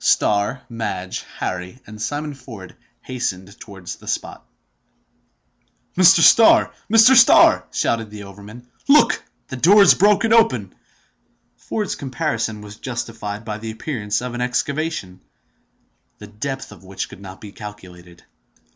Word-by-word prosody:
Starr, 105 Hz, +6 st, +1 dB
Madge, 95 Hz, -6 st, -5 dB, 0.2 s
Harry, 90 Hz, +4 st, -5 dB
and 105 Hz, 0 st, -11 dB
Simon 145 Hz, +5 st, -4 dB
Ford 115 Hz, -8 st, -12 dB, 0.3 s
hastened 100 Hz, -6 st, -5 dB
towards 95 Hz, -4 st, -10 dB
the -, -, -18 dB
spot. -, -, -4 dB, 1.5 s
"Mr. 180 Hz, -2 st, +6 dB
Starr! 225 Hz, +7 st, +6 dB, 0.2 s
Mr. 225 Hz, +4 st, +7 dB
Starr!" -, -, +6 dB
shouted 115 Hz, -2 st, -1 dB
the 105 Hz, -1 st, -10 dB
overman. 105 Hz, +5 st, -13 dB, 0.2 s
"Look! 295 Hz, +2 st, +4 dB, 0.3 s
the 130 Hz, -, -6 dB
door 200 Hz, +10 st, +6 dB
is -, -, +7 dB
broken 210 Hz, +3 st, +3 dB
open!" 230 Hz, 0 st, +2 dB, 0.8 s
Ford's 210 Hz, -3 st, -4 dB
comparison 115 Hz, -5 st, -3 dB
was 105 Hz, 0 st, -11 dB
justified 115 Hz, -4 st, -6 dB
by 105 Hz, -1 st, -5 dB
the 110 Hz, 0 st, -7 dB
appearance 110 Hz, -2 st, -4 dB
of 125 Hz, -1 st, -5 dB
an 120 Hz, -, -4 dB
excavation, 125 Hz, -, -3 dB, 1.0 s
the 105 Hz, -, -11 dB
depth 135 Hz, +6 st, -6 dB
of 95 Hz, -4 st, -15 dB
which 95 Hz, 0 st, -6 dB
could -, -, -14 dB
not 95 Hz, -1 st, -11 dB
be 105 Hz, -, -11 dB
calculated. 90 Hz, -5 st, -12 dB
110 Hz, 130 wpm, -20 LUFS, 100-140 Hz, 1.5 s, Mr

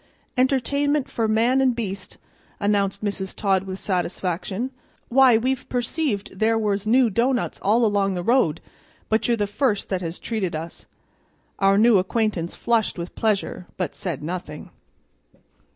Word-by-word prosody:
"Entertainment 280 Hz, +2 st, +1 dB
for 225 Hz, -1 st, -1 dB
man 235 Hz, +5 st, +3 dB
and 255 Hz, -2 st, +3 dB
beast," 200 Hz, -5 st, -5 dB, 0.4 s
announced 200 Hz, -1 st, 0 dB
Mrs. 190 Hz, -2 st, -3 dB
Todd 195 Hz, -2 st, +1 dB
with 190 Hz, 0 st, -5 dB
satisfaction. 190 Hz, +5 st, -2 dB, 0.4 s
"Why, 255 Hz, -2 st, +6 dB
we've 255 Hz, +3 st, -2 dB
perceived 245 Hz, -, -2 dB
there 225 Hz, +1 st, +3 dB
was 210 Hz, -1 st, -1 dB
new 240 Hz, 0 st, +4 dB
doughnuts 245 Hz, +4 st, 0 dB
all 225 Hz, +4 st, +3 dB
along 200 Hz, -2 st, +1 dB
the 175 Hz, -, -3 dB
road, 205 Hz, -, +2 dB, 0.5 s
but 220 Hz, +1 st, +2 dB
you're 235 Hz, -1 st, +2 dB
the 205 Hz, -, +1 dB
first 210 Hz, +1 st, -1 dB
that 190 Hz, -2 st, -1 dB
has 165 Hz, 0 st, -4 dB
treated 205 Hz, -8 st, -3 dB
us." 165 Hz, +2 st, -7 dB, 0.7 s
Our 195 Hz, 0 st, +4 dB
new 220 Hz, -1 st, +6 dB
acquaintance 190 Hz, -3 st, -1 dB
flushed 230 Hz, -4 st, 0 dB
with 170 Hz, 0 st, -6 dB
pleasure, 205 Hz, -4 st, -1 dB
but 180 Hz, -, -2 dB
said 170 Hz, -7 st, -5 dB
nothing. 160 Hz, -2 st, -6 dB
210 Hz, 145 wpm, -23 LUFS, 190-240 Hz, 0.7 s, Why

